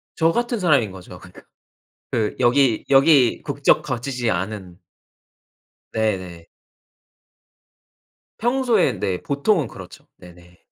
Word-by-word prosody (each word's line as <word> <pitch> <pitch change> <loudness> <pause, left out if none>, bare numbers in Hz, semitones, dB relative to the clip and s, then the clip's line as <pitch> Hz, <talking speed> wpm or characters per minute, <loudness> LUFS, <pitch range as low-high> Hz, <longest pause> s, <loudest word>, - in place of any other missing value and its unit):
저 165 0 +2
같은 240 +2 -2
사람인 140 - +2
거죠. 95 -1 -12
그러니까. - - -15 0.7
그 110 -3 -1
여기 125 -1 +2
여기 135 -2 +4
국적 140 -1 +1
가지지 125 -2 -3
않은 95 -1 -5 1.1
네네. 95 -6 -3 1.9
평소에 240 -3 +1
네 95 -2 -1
보통은 145 - 0
그렇죠. 95 -4 -13
네네. 90 0 -17
120 Hz, 215 characters per minute, -21 LUFS, 95-150 Hz, 1.9 s, 여기